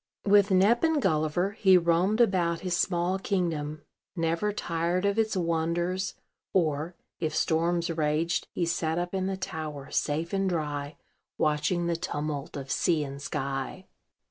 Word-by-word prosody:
With 205 0 +5
Nep 200 - +4
and 320 -2 +3
Gulliver 155 - +1
he 190 -3 +5
roamed 175 +5 +2
about 175 -6 +2
his 180 -2 -1
small 180 +1 +1
kingdom, 160 -6 -2 0.3
never 165 +4 0
tired 175 -1 -1
of 200 +2 +1
its 215 -2 +1
wonders; 170 +2 -1 0.4
or, 160 -1 0 0.2
if 155 -2 -2
storms 170 +2 +1
raged, 155 +1 0
he 175 - -1
sat 165 -1 -1
up 175 +1 -2
in 190 -1 0
the 195 0 -2
tower, 155 -6 -6
safe 160 +4 -1
and 195 -1 +1
dry, 150 -3 -3 0.4
watching 155 +4 +1
the 170 0 0
tumult 150 -3 -4
of 135 -1 -6
sea 165 -4 +2
and 140 0 -7
sky. 135 +7 -4
170 Hz, 145 wpm, -28 LUFS, 155-190 Hz, 0.4 s, With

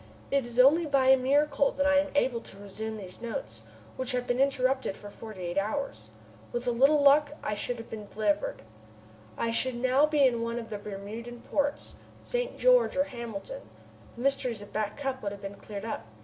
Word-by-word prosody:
It 275 -3 +1
is 240 0 -10
only 300 +6 +6
by 270 -2 +3
a 265 - +9
miracle 280 +2 +2
that 280 - 0
I 290 0 +5
am 290 0 -1
able 250 -4 +2
to 195 - -11
resume 215 +2 -5
these 190 -1 -9
notes, 115 - -5 0.4
which 260 0 -2
have 250 0 -1
been 245 0 0
interrupted 265 -5 +1
for 205 - -10
forty 215 -4 -9
eight 175 +2 0
hours. 210 - -3 0.4
With 240 +1 -3
a 245 - +2
little 275 +5 +4
luck, 290 +1 +5
I - - -1
should 240 +4 -2
have 230 - -8
been 215 -2 -7
delivered! 205 - -1 0.7
I 230 - 0
should 255 +2 0
now 260 +4 +3
be 300 -2 +4
in 240 -3 +2
one 230 0 -2
of 230 -1 -6
the 210 - -4
Bermudan 215 +4 -7
ports 285 0 -1 0.3
St. - - -2
George - - +4
or 280 - +4
Hamilton. 235 - -7 0.5
The 240 - -8
mysteries 255 -5 0
of 205 - -14
Back 215 -1 -2
Cup 270 -2 -3
would 200 -1 -3
have 200 - -10
been 195 0 -5
cleared 200 +1 -8
up. 225 - -4
245 Hz, 205 wpm, -29 LUFS, 215-275 Hz, 0.7 s, a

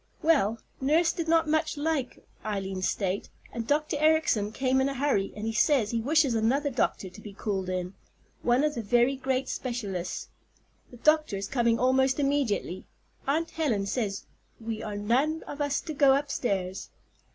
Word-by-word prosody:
"Well, 275 -9 +3 0.2
nurse 310 +5 +3
did 335 -1 -3
not 330 0 +3
much 310 0 0
like 290 -4 -2 0.2
Eileen's 195 -3 -2
state, 195 0 -2 0.2
and 230 -1 -4
Dr. 300 +2 +1
Ericson 310 -10 +3
came 265 +2 +1
in 270 - +1
a 275 - -4
hurry, 260 -8 +1
and 210 +1 -5
he 225 - -1
says 225 -1 +3
he 230 -1 0
wishes 290 +1 +3
another 260 +6 +1
doctor 235 -5 0
to 210 - -13
be 210 -2 -9
called 195 -2 -3
in, 180 0 -3 0.5
one 245 +3 +3
of 300 -1 +1
the 235 - -3
very 240 +5 +3
great 265 0 -1
specialists. 205 -8 -4 0.6
The 245 - -13
doctor 305 -4 +2
is 195 0 -4
coming 235 -2 +2
almost 265 +2 +2
immediately. 275 -10 0 0.4
Aunt 320 +4 0
Helen 240 -12 0
says 200 -2 -2 0.3
we 225 -1 -4
are 210 -1 -5
none 265 +10 +1
of 290 - -7
us 285 0 +1
to 320 - -6
go 275 -2 +5
upstairs. 200 -10 -2
255 Hz, 170 wpm, -28 LUFS, 210-290 Hz, 0.6 s, go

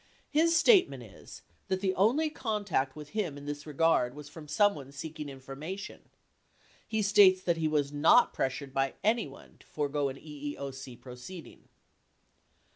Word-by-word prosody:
His 330 +2 +3
statement 385 -1 +4
is - - -13 0.2
that 190 -1 0
the 190 -1 0
only 255 - +2
contact 205 - -1
with 150 -1 -9
him 180 -9 -3
in 145 - -10
this 145 +1 -6
regard 150 -4 +2
was 150 0 -10
from 155 0 -11
someone 155 -7 +1
seeking 150 +1 -7
information. 140 +8 -8 0.8
He 220 -1 -1
states 195 -2 +6
that 170 -2 +1
he 160 -1 0
was 145 -2 0
not 160 +11 +5
pres 130 - 0
sured 135 -1 -8
by 135 0 0
anyone 215 - -2
to - - -21
forego 145 -1 -1
an 135 - -7
EEOC 140 -4 -7
proceeding. 130 +7 -11
150 Hz, 150 wpm, -30 LUFS, 140-200 Hz, 0.8 s, states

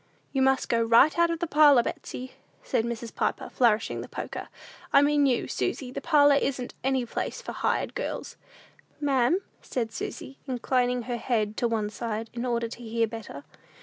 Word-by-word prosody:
"You 270 - +1
must 265 0 +3
go 230 -1 +2
right 230 +6 +5
out 340 0 +5
of 335 - -1
the 345 - -2
parlor, 295 -6 +6
Betsey," 255 +2 -6 0.3
said - - 0
Mrs. 235 -1 -5
Piper, - - -2
flourishing 225 -3 +2
the - - -9
poker; - - -6 0.4
"I 280 - +6
mean 290 -1 +3
you, 245 -3 +1
Susy 255 -2 -2
the - - -5
parlor 290 -3 +5
isn't 270 -3 -1
any 265 -1 +1
place - - -4
for - - -7
hired - - -1
girls." - - -4 0.6
"Ma'am?" 275 +3 +2 0.2
said 230 -3 -3
Susy, 270 +4 -6
inclining 250 -1 0
her 240 0 -3
head 220 -3 -1
to 240 - +1
one 215 -2 -1
side, 225 0 -4
in 240 +1 -3
order 235 -1 0
to 235 - -10
hear 230 0 0
better. 220 -10 -8
245 Hz, 180 wpm, -27 LUFS, 230-275 Hz, 0.6 s, parlor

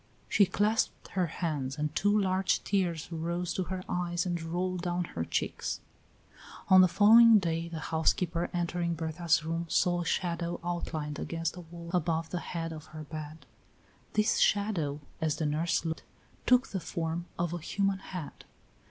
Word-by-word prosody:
She 200 - +4
clasped 215 +4 0
her 180 -2 0
hands 150 -5 -3
and 150 0 -2
two 205 +2 +3
large 190 -1 +1
tears 175 -5 -1
rose 170 +2 -2
to 185 - -1
her 185 0 -4
eyes 175 0 -1
and 175 -2 -2
rolled 180 +2 -2
down 175 0 -1
her 85 - -4
cheeks. - - -2 0.9
On 185 0 +9
the 185 - +7
following 225 +4 +8
day 165 -3 -1
the 165 - -5 0.2
housekeeper, 170 +1 +1
entering 175 -1 -1
Berta's 160 0 0
room, 165 +1 -2
saw 175 +1 +2
a - - -4
shadow 170 -1 -1
outlined 160 -4 -3
against 165 -1 -2
the 180 - -8
wall 170 0 -10
above 165 -2 0
the 180 - -1
head 165 -1 -4
of 155 -1 -9
her 155 0 -8
bed. 155 +1 -8 0.7
This 215 0 +2
shadow, 175 -9 +1 0.2
as 155 -2 +1
the 160 - -2
nurse 160 +3 0
looked, 160 0 -2 0.5
took 250 +1 +5
the 190 - -2
form 170 0 -3
of 175 0 -1
a 175 - -3
human 195 +4 0
head. 180 -5 -8
170 Hz, 165 wpm, -30 LUFS, 160-185 Hz, 0.9 s, On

